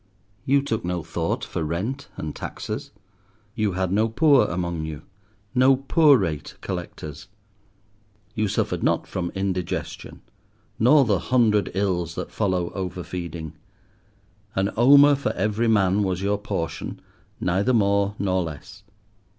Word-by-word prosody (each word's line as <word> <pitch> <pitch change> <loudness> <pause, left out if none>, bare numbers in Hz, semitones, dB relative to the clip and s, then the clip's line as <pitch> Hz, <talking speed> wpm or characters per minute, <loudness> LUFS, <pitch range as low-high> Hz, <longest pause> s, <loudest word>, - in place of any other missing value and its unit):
You 140 +1 +3
took 115 -6 -2
no 90 -1 -2
thought - - -2
for 85 - -3
rent 105 - -3
and 75 -1 -5
taxes; - - -5 0.6
you 105 -4 0
had 95 0 -1
no 110 +3 +2
poor 145 +4 +4
among 85 -2 -3
you—no 100 - -1
poor 140 +2 +5
rate 80 -8 -3
collectors. 75 +3 -6 1.1
You 110 0 0
suffered - - -1
not - - +1
from 85 -2 -3
indigestion, 95 -2 -4 0.6
nor 135 +5 +6
the 100 -5 +2
hundred 110 -2 +2
ills 90 -4 -1
that - - -5
follow 95 -5 -1
over 90 -2 -4
feeding; 85 -3 -6 1.0
an 95 +1 +1
omer 140 +5 +7
for 140 0 -1
every 105 +4 0
man 100 -2 +3
was 95 -1 -1
your 100 +1 0
portion, 100 -6 -4 0.4
neither 95 +7 +1
more 100 -3 +2
nor 95 -2 0
less. 80 -4 -8
100 Hz, 130 wpm, -24 LUFS, 90-115 Hz, 1.1 s, omer